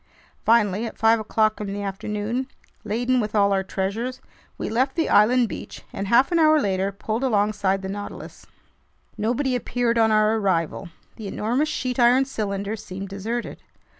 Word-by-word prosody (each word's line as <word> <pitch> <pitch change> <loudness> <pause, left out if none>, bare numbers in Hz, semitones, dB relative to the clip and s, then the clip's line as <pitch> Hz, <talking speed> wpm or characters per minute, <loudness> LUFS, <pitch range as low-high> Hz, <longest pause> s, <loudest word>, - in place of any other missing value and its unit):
Finally, 220 -1 +3
at - - -9
five 225 +1 +4
o'clock 215 0 +1
in 210 - -4
the 205 0 -4
afternoon, 210 +5 -3 0.4
laden 245 +4 0
with 215 -1 -2
all 200 -1 +4
our 195 - +2
treasures, 200 +7 -3 0.4
we - - -4
left 260 +4 0
the 330 - +1
island 235 +3 +5
beach - - -8
and 195 - -4
half 245 - +4
an 340 - +3
hour 310 -1 +5
later 195 -4 0
pulled 215 +5 -3
alongside 205 -4 +1
the - - -3
Nautilus. 205 +1 -8 0.7
Nobody 245 +5 0
appeared 240 -1 0
on 220 -1 +4
our 215 +1 +3
arrival. 185 -3 -1 0.3
The 220 -3 -7
enormous 245 +10 -1
sheet 255 -4 -3
iron 245 +3 +5
cylinder 205 -4 -3
seemed 195 -2 -8
deserted. 220 +5 -4
215 Hz, 165 wpm, -23 LUFS, 200-245 Hz, 0.7 s, island